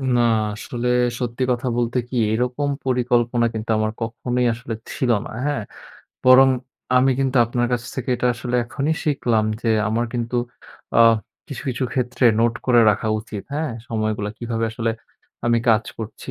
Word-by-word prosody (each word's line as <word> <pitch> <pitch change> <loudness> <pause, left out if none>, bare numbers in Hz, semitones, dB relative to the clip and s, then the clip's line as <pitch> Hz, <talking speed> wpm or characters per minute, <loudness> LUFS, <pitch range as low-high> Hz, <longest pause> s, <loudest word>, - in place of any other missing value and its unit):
না 120 - +4 0.3
আসলে 120 +2 -4 0.3
সত্যি 125 0 -2
কথা 125 +1 -1
বলতে 120 +1 0
কি 125 - -3 0.2
এরকম 125 +5 -1 0.2
পরিকল্পনা 120 -1 +2
কিন্তু 110 0 -5
আমার 110 0 0
কখনোই 125 +2 -1
আসলে 115 0 -6 0.2
ছিল 125 -2 0
না। - - -8
হ্যাঁ? 145 -6 -1 0.6
বরং 130 +1 +8 0.5
আমি 130 +1 +5
কিন্তু 135 -1 0
আপনার 120 +1 0
কাছ 120 - 0
থেকে 130 -2 -5
এটা 125 - 0
আসলে 125 0 -5
এখনই 140 +6 -1
শিখলাম 120 -7 +1 0.2
যে 115 - 0 0.2
আমার 115 +2 0
কিন্তু 120 0 -2 0.6
আ - - +7 0.5
কিছু, 140 -2 -6
কিছু 130 +1 -1
ক্ষেত্রে 125 -1 -1 0.2
নোট 115 0 +2
করে 120 -2 +5
রাখা 110 +2 -1
উচিত। 105 -2 -7
হ্যাঁ? 155 0 -1 0.2
সময়গুলা 110 -2 -2
কিভাবে 115 -1 -2
আসলে 115 0 -1 0.6
আমি 120 0 +3
কাজ 110 0 +4
করছি 110 -1 -7
120 Hz, 160 wpm, -22 LUFS, 115-125 Hz, 0.6 s, বরং